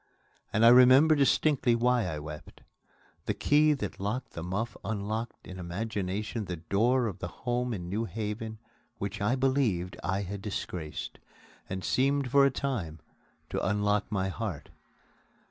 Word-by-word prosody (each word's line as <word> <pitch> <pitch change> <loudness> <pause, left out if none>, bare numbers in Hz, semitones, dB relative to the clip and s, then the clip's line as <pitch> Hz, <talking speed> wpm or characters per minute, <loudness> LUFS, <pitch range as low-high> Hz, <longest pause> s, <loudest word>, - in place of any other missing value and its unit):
And 110 +2 +3
I - - +10
remember 130 +5 +7
distinctly 140 -3 +3
why 120 -2 +2
I 80 -3 -3
wept. 75 0 -9 0.7
The - - 0
key 150 +1 +4
that 105 -9 -5
locked 110 +7 -3
the 85 - -6
muff 100 +7 -3
unlocked 110 +2 -4
in 95 0 -8
imagination 105 +3 -3
the 90 -1 -4
door 110 +10 +1
of 100 -6 -4
the - - -4
home 125 +5 -2
in 90 -6 -4
New 105 +6 -1
Haven 110 0 -4 0.4
which 100 +2 -4
I 110 +5 +2
believed 130 -9 +1
I 95 +3 -1
had 100 +1 -6
disgraced 90 -6 -5 0.5
and 95 -1 -4
seemed 135 0 +1
for 140 0 +6
a - - +3
time 115 - -3 0.5
to - - -2
unlock 105 +2 +1
my 95 -2 0
heart. 95 -7 -5
110 Hz, 150 wpm, -29 LUFS, 95-125 Hz, 0.7 s, I